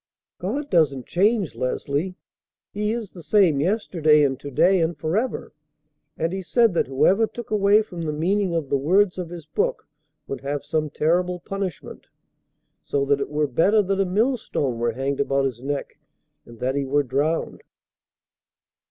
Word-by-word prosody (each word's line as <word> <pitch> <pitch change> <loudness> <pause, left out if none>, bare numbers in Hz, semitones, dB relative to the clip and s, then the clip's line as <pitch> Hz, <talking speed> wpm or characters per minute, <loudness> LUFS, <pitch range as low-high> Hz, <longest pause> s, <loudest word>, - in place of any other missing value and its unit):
"God 275 +11 -3
doesn't 140 -7 +2
change, 200 0 +1
Leslie. 140 +8 -2 0.6
He 210 +1 -1
is 225 -4 -4
the 175 - -11
same 170 -5 +3
yesterday 160 -4 +3
and 135 -2 0
to 145 - -7
day 180 +7 +3
and 165 -1 0
forever. 200 - -2 0.6
And 165 +2 -1
He 190 - -3
said 230 +3 +3
that 170 - +1
whoever 190 - +3
took 240 -1 -9
away 210 +1 +4
from 175 -5 -8
the 160 -2 -2
meaning 180 +4 0
of 155 -5 -2
the 140 - +2
words 185 +6 +2
of 175 -2 -4
His 170 -3 -9
book 155 - -2 0.4
would 135 - -6
have 145 +1 -3
some 155 0 -1
terrible 180 +4 0
punishment, 195 -2 -6 0.8
so 140 -1 -1
that 140 0 +1
it - - -3
were 150 +1 0
better 190 - +3
that 195 +1 0
a - - +2
millstone 195 - 0
were 120 0 0
hanged 135 +3 -2
about 135 -1 +1
his 125 -3 -3
neck 140 +1 -4 0.5
and 120 0 -13
that 130 +3 -1
he 140 0 -1
were 145 +2 +1
drowned." 145 +5 -1
165 Hz, 170 wpm, -23 LUFS, 140-195 Hz, 0.8 s, away